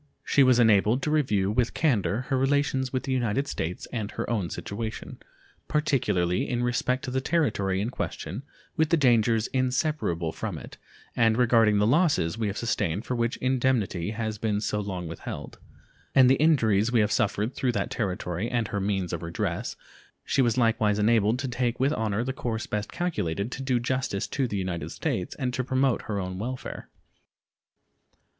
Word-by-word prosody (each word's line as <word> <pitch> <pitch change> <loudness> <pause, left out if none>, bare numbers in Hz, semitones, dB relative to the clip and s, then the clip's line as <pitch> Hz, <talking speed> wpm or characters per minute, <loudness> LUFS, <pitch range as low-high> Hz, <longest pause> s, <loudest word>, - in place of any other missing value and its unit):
She 140 - +3
was 130 -2 +6
enabled 110 +2 +4
to 150 - 0
review 105 -11 +2
with 120 +1 0
candor 120 - +1
her 130 +1 -1
relations 135 -1 +1
with 130 - -2
the 135 - -3
United 130 +2 0
States 85 -6 -4
and 110 -4 -2
her - - -4
own 105 -7 -1
situation, 110 +2 -6 0.5
particularly 115 - +1
in 120 -1 0
respect 125 +1 0
to 125 - -4
the 130 +1 0
territory 110 - 0
in 110 +5 -2
question, 130 - -4 0.3
with 160 -2 +2
the 170 - +4
dangers 115 -5 +3
inseparable 130 - 0
from - - -5
it, - - -10 0.4
and 115 -1 +3
regarding 115 -4 +4
the 105 - +3
losses 140 - +2
we 110 -1 -1
have 100 - -3
sustained 100 -3 -1
for - - -2
which 120 0 -1
indemnity 125 -9 0
has 110 -1 -3
been 105 -1 0
so 105 0 -1
long 95 -4 -4
withheld, 80 - -7 0.6
and 130 -1 +7
the - - +6
injuries 115 -9 +3
we 120 -3 +4
have 105 0 +1
suffered 105 +3 0
through 125 -2 0
that 100 -3 -2
territory, 90 0 -2
and 120 -4 -1
her 100 - -2
means 95 -3 -1
of 85 - -3
redress, 85 0 -3 0.5
she 140 - +2
was 120 -2 +2
likewise 115 -3 +2
enabled 110 +1 +3
to 130 +1 -3
take 120 -1 -1
with 135 +3 +2
honor 110 0 -1
the 130 +1 -3
course 115 -4 -3
best 105 0 -3
calculated 110 - -2
to 130 - -5
do 130 -2 +1
justice 125 -4 -1
to 135 -3 -1
the 105 - -3
United 90 -3 -3
States 90 - -3
and 125 -3 -2
to 130 - -1
promote 130 0 +1
her 105 - -4
own 95 0 -4
welfare. 125 +4 -5
115 Hz, 180 wpm, -27 LUFS, 100-130 Hz, 0.6 s, and